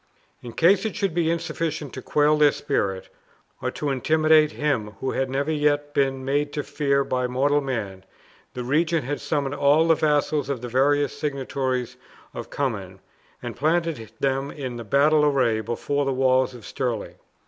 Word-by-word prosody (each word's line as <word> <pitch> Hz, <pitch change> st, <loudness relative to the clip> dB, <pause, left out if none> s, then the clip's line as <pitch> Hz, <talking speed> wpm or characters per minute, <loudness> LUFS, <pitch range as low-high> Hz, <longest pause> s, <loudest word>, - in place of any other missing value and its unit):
In 120 Hz, -2 st, -9 dB
case 185 Hz, +7 st, +4 dB
it 220 Hz, -, -3 dB
should 195 Hz, -4 st, -1 dB
be 165 Hz, -1 st, +1 dB
insufficient 160 Hz, -3 st, -3 dB
to 130 Hz, -, -6 dB
quail 150 Hz, +2 st, +2 dB
their 150 Hz, -1 st, +5 dB
spirit, 95 Hz, -7 st, -2 dB, 0.5 s
or -, -, -1 dB
to 145 Hz, -2 st, -3 dB
intimidate 155 Hz, +2 st, +3 dB
him 120 Hz, -9 st, -1 dB
who 130 Hz, -, -2 dB
had 135 Hz, 0 st, -1 dB
never 140 Hz, +3 st, -1 dB
yet 145 Hz, -1 st, 0 dB
been 135 Hz, -1 st, 0 dB
made 145 Hz, +2 st, 0 dB
to 145 Hz, -, -2 dB
fear 140 Hz, -2 st, 0 dB
by 125 Hz, -2 st, -1 dB
mortal 140 Hz, +4 st, +1 dB
man, 105 Hz, -9 st, -4 dB, 0.5 s
the 125 Hz, -, -4 dB
regent 160 Hz, +5 st, +1 dB
had 145 Hz, +2 st, -3 dB
summoned 145 Hz, -3 st, -1 dB
all 145 Hz, +4 st, +3 dB
the 165 Hz, -, +6 dB
vassals 150 Hz, -2 st, +1 dB
of 135 Hz, -4 st, -2 dB
the 125 Hz, -, -5 dB
various 145 Hz, +3 st, +2 dB
seigniories 130 Hz, -3 st, -3 dB, 0.4 s
of -, -, -7 dB
Cummin, 100 Hz, -9 st, -3 dB, 0.4 s
and -, -, -5 dB
planted 160 Hz, -, 0 dB
them 135 Hz, +1 st, 0 dB
in 130 Hz, -5 st, -6 dB
battle 150 Hz, +6 st, +4 dB
array 130 Hz, -7 st, +2 dB
before 140 Hz, +6 st, -2 dB
the 135 Hz, -1 st, 0 dB
walls 130 Hz, 0 st, +2 dB
of 115 Hz, -4 st, -12 dB
Stirling. 120 Hz, -5 st, -3 dB
140 Hz, 170 wpm, -24 LUFS, 130-150 Hz, 0.5 s, the